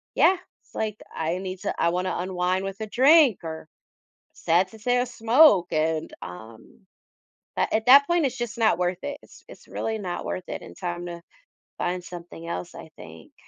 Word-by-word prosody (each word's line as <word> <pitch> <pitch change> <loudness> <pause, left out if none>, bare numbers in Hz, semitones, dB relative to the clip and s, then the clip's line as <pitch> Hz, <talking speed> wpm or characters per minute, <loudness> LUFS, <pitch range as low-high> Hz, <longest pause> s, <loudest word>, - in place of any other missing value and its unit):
yeah, 380 - +5 0.3
it's - - -30
like, 215 -1 -2 0.2
"I 165 +3 -1
need 185 -1 -6
to - - -2
I 170 - +4
wanna 180 +2 -1
unwind 185 +1 -1
with 195 +2 -6
a 215 - -3
drink 270 - +5
or, 160 -1 -7 0.7
sad 170 +3 +1
to 220 - -14
say, 245 +3 +1
a 250 - +1
smoke," 230 - +5
and, 155 0 0
um 110 +5 -11 0.8
a - - 0
at 220 +2 0
that 280 +2 +8
point, 345 -3 +2
it's 255 -1 -4
just 240 +1 -4
not 220 -5 +3
worth 180 0 0
it, 285 0 -5
it's - - -17
it's - - -15
really 220 0 -3
not 180 -3 -4
worth 185 - -5
it - - -5
in - - -11
time 175 -1 -5
to 170 -1 -7 0.6
find 180 0 -2
something 170 -2 -9
else, 170 - -5
I 160 - -11
think. 80 0 -13
185 Hz, 190 wpm, -25 LUFS, 175-235 Hz, 0.8 s, that